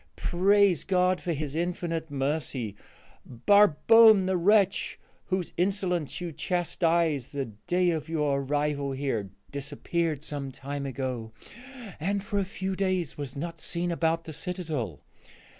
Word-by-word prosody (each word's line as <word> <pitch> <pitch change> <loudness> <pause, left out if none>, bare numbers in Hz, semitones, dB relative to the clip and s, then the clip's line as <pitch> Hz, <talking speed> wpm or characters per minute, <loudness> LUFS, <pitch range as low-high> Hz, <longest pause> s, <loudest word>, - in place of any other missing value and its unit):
Praise 195 -1 +3
God 185 -1 +2
for 175 - -2
his 150 -2 -3
infinite 165 -1 -2
mercy! 135 -6 -2 0.5
Barbone, 205 - +6
the 190 0 +1
wretch 195 +2 +2 0.3
whose 185 -2 -2
insolence 180 -4 0
you 175 -1 -4
chastised 165 -4 0
the 140 -1 -2 0.2
day 180 0 +3
of 160 -1 -3
your 150 -4 +1
arrival 145 0 -1
here, 130 -8 -2 0.2
disappeared 150 +2 -2
some 145 -3 -4
time 140 +1 -5
ago 125 -4 -4 0.7
and 195 +5 -1
for 205 -1 -1
a 195 - 0
few 190 -1 -4
days 185 -6 -1
was 145 -4 -6
not 165 +3 -5
seen 175 +1 -2
about 165 0 0
the 160 - -8
citadel. 155 - -4
165 Hz, 130 wpm, -28 LUFS, 140-185 Hz, 0.7 s, Barbone